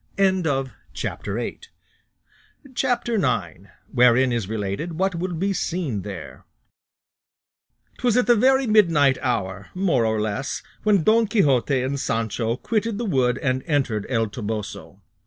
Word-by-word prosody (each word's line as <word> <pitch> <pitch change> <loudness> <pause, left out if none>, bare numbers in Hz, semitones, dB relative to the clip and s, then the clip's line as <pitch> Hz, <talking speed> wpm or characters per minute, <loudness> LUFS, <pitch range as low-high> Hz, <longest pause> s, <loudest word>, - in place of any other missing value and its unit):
CHAPTER - - -4
IX. 465 - -5 2.2
WHEREIN 125 +1 +5
IS 115 -5 -2
RELATED 110 - -3
WHAT 190 +4 0
WILL 175 +1 -3
BE 195 +4 0
SEEN 160 - -2
THERE 95 -5 -8 1.6
'Twas 245 -1 +2
at 250 - +3
the 240 +2 +5
very 265 +4 +4
midnight 165 - +4
hour 100 -7 -2
more 180 -10 +2
or 110 -1 +1
less 110 +6 -3 0.2
when 205 -5 +3
Don 225 +3 +4
Quixote 140 - +2
and 140 +2 -2
Sancho 115 0 -1
quitted 220 - -1
the 240 - -3
wood 130 - +1
and 130 -1 +1
entered 130 - 0
El 115 -3 +1
Toboso. 105 -1 -6
135 Hz, 120 wpm, -23 LUFS, -, 2.2 s, WHEREIN